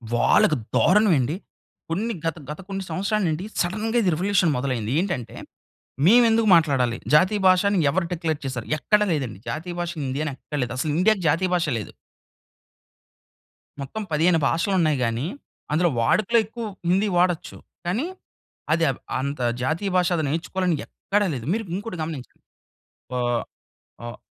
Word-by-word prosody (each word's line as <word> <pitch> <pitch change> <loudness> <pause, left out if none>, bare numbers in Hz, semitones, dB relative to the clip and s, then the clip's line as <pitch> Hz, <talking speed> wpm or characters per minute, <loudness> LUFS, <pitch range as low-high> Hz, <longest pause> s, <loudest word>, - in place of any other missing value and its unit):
వాళ్ళకి 150 - +4 0.2
దారుణం 210 +3 +4
ఏండి. 135 +7 -1 0.5
కొన్ని 215 +8 -1
గత, 165 0 0
గత 150 - -6
కొన్ని 195 0 -3
సంవత్సరాలు 200 +1 0
నుండి 160 +5 -2 0.2
సడెన్‌గా 215 +6 -1
ఇది 180 - +2
రివల్యూషన్ 180 -1 +2
మొదలైంది. 125 -4 -2
ఏంటంటే 160 - -4 0.7
మేవెందుకు 225 0 +5
మాట్లాడాలి? 135 -8 +3 0.2
జాతీయ 190 +7 +4
భాషని 190 +2 +4
ఎవరు 170 +3 0
డిక్లేర్ 160 -3 -2
చేశారు? 125 -3 -4
ఎక్కడ 210 +8 +2
లేదండి. 130 -10 -3
జాతీయ 175 +3 -4
భాష 175 0 -2
హిందీ 135 +2 -2
అని 150 - -3
ఎక్కడ 150 - -7
లేదు. 125 0 -2
అసలు 150 +3 -1
ఇండియాకి 195 +1 +3
జాతీయ 180 +5 +1
భాషే 165 -6 0
లేదు. 105 - -7 1.9
మొత్తం 180 +11 -5
15 165 +2 +3
భాషలు 170 +4 0
ఉన్నాయి 155 -4 +2
గానీ 115 +3 -1 0.5
అందులో 175 +3 +3
వాడుకలో 215 - +2
ఎక్కువు 225 +1 -6 0.2
హిందీ 195 +4 +3
వాడచ్చు. 175 -2 0 0.3
కానీ 210 - 0 0.7
అదెవ్ 160 -6 +1 0.2
అంత 140 +1 -3 0.2
జాతీయ 160 +9 -1
భాష 180 -1 +3
అది 160 - -1
నేర్చుకోవాలని 170 +4 -1
ఎక్కడా 205 +1 -1
లేదు. 120 -3 -5
మీరు 225 +1 -1
ఇంకోటి 200 -2 -5
గమనించండి. 155 -5 -8 0.7
వా 125 - -1 0.9
ఆహ్, 120 - -7
175 Hz, 145 wpm, -24 LUFS, 145-195 Hz, 1.9 s, మేవెందుకు